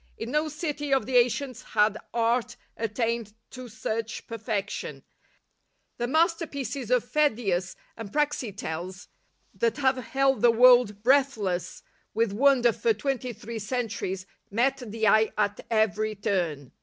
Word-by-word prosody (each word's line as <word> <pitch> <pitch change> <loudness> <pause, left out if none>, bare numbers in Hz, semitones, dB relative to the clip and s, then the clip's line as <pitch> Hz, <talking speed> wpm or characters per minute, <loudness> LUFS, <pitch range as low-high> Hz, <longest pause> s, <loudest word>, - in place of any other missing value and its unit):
In 230 +2 -5
no 300 +2 +1
city 295 -2 -4
of 270 -1 +3
the 260 -1 +2
ancients 245 +1 +1
had 210 -2 +2 0.2
art 235 +1 0 0.2
attained 225 -1 -2 0.2
to 255 -1 -8
such 225 0 -4
perfection. 220 -3 -4 1.0
The 240 - 0
masterpieces 280 - 0
of 250 -2 +3
Pheidias 215 -11 0 0.2
and 225 -3 -8
Praxiteles, 200 - -3 0.4
that 465 -6 0
have 265 -2 +2
held 270 +1 +1
the 240 - +6
world 235 -3 +5
breath 270 +1 +4
less 180 -4 -3 0.3
with 225 -2 +1
wonder 250 0 +4
for 450 - +1
twenty 265 -3 -2
three 230 0 -7
centuries, 210 -5 -3 0.2
met 260 +6 +1
the 220 -1 -1
eye 220 +2 +5
at 205 -1 0
every 215 -1 +1
turn. 170 -9 -2
235 Hz, 130 wpm, -27 LUFS, 210-270 Hz, 1.0 s, the